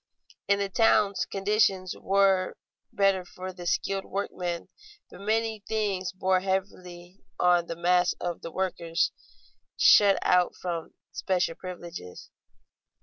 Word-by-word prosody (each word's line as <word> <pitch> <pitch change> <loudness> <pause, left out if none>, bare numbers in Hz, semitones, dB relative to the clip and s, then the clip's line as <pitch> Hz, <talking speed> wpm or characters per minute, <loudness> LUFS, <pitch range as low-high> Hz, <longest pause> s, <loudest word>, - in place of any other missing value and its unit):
In 200 - +3
the 200 0 -1
towns 200 0 +2
conditions 195 -2 +1
were 195 -1 +2 0.3
better 195 -2 +2
for 185 +1 -8
the 175 -1 -8
skilled 195 +3 -1
workmen, 180 -3 -4 0.4
but - - -12
many 220 +1 0
things 200 -4 -1
bore 185 0 +1
heavily 185 -1 -4 0.2
on 175 -1 +3
the 170 - -4
mass 180 +1 +2
of 175 -1 -5
the - - -6
workers 175 -2 -1 0.7
shut 200 -2 +6
out 180 -1 +3
from 170 -3 -5 0.2
special 180 -3 -1
privileges. 175 - -9
185 Hz, 120 wpm, -27 LUFS, 175-195 Hz, 0.7 s, shut